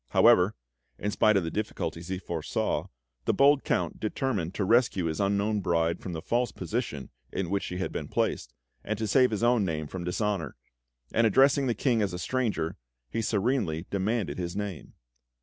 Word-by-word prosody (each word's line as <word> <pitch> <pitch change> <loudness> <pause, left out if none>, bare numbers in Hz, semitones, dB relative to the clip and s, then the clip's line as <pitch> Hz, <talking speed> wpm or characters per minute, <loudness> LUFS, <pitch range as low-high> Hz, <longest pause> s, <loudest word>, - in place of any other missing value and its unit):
However, - - +5 0.4
in 105 - -2
spite 110 0 +4
of 95 - +1
the 80 - -3
difficulties 90 -5 -3
he 95 0 -2
foresaw, 85 -4 -2 0.4
the - - +2
bold 140 0 +5
Count - - -1
determined 105 -6 -2
to 100 - 0
rescue 115 -5 +3
his 80 -1 -2
unknown 100 +1 +1
bride 85 -2 +1
from 90 - -5
the 80 0 -5
false 120 +5 0
position 105 - -4 0.2
in 95 -2 -3
which 100 0 +1
she 90 - -5
had 95 - -2
been - - -4
placed, - - -1 0.3
and 110 +1 -2
to 110 - -2
save 125 +4 +4
his 110 0 -2
own 120 -2 +4
name 80 -4 -2
from 90 +4 -6
dishonour; 95 0 -1 0.6
and 115 0 +4
addressing 135 +5 +4
the 120 - +1
King 120 -5 +1
as 100 -3 0
a - - -3
stranger, 100 -4 -1 0.3
he 115 - -1
serenely 100 -6 0
demanded 100 0 -1
his 85 0 -3
name. 100 -5 -5
100 Hz, 185 wpm, -28 LUFS, 90-115 Hz, 0.6 s, However